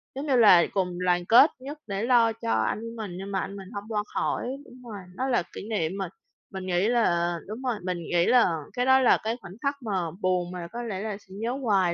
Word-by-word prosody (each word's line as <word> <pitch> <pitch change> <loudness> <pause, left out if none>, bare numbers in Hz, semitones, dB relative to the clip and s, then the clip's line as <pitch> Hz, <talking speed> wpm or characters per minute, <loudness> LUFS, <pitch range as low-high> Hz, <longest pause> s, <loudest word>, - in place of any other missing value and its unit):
Giống 280 +3 -4
như 270 - +3
là 205 -8 +7
cùng 180 -3 -1
đoàn 175 -1 +2
kết 240 - +7
nhất 280 +4 -7
để 200 +1 -3
lo 235 -2 +4
cho 220 - -4
anh 110 - +1
của 230 +1 -7
mình, 215 -4 -5
nhưng 195 +1 -6
mà 190 - 0
anh 195 - -5
mình 195 -2 -9
hông 200 - -4
qua 210 -2 -1
khỏi. - - -1 0.2
Đúng 250 0 -15
rồi, 205 - -6 0.2
nó 260 - -2
là 240 -9 +2
kỷ 205 - -7
niệm 170 -8 0
mà 190 -3 -3 0.4
mình 190 -1 -5
nghĩ 180 +3 +1
là 175 -8 +2
đúng 215 +5 -6
rồi, 250 -3 -1
mình 180 -1 -2
nghĩ 175 +1 +1
là 245 -1 +5 0.3
cái 245 - 0
đó 265 0 +6
là 255 - +5
cái 225 +2 -2
khoảnh 190 -3 -10
khắc 280 0 0
mà 220 - -5 0.3
buồn 180 -1 0
mà 175 -2 -6
có 240 +2 -5
lẽ 210 -5 -4
là 210 -2 -4
sẽ 190 -2 -17
nhớ 235 +2 -1
hoài 190 -6 +2
205 Hz, 250 wpm, -26 LUFS, 180-240 Hz, 0.4 s, là